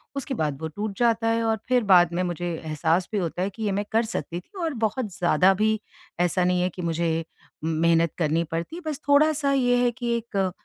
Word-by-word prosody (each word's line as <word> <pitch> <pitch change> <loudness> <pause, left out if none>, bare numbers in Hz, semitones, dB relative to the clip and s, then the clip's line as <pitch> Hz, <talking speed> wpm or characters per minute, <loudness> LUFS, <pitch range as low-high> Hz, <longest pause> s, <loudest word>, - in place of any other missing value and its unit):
उसके 275 0 -3
बाद 150 - -1
वो 160 - -2
टूट 200 +5 -5
जाता 230 -1 +2
है। 230 0 +1
और 225 -1 +1
फिर 250 -2 +3
बाद 175 -4 +5
में 175 - 0
मुझे 175 -1 -3 0.2
एहसास 160 +3 0
भी 215 - -1
होता 175 -2 -2
है 190 - 0
कि 220 +3 -8
ये 205 - 0
मैं 200 +2 -1
कर 225 +1 +3
सकती 175 -6 -4
थी 285 - -17
और 325 -2 -1
बहुत 220 +2 0
ज़्यादा 180 +2 +4
भी 215 +2 +1 0.4
ऐसा 180 +1 +2
नहीं 180 0 +2
है 180 - +1
कि 180 - -8
मुझे 165 -1 -1 0.4
मेहनत 165 0 +2
करनी 165 0 +1
पड़ती, 170 - -5
बस 300 -3 -3
थोड़ा-सा 290 0 +4
ये 245 -2 +3
है 245 - +3
कि 240 0 -2
एक 200 -5 -2
195 Hz, 220 wpm, -25 LUFS, 170-235 Hz, 0.4 s, बाद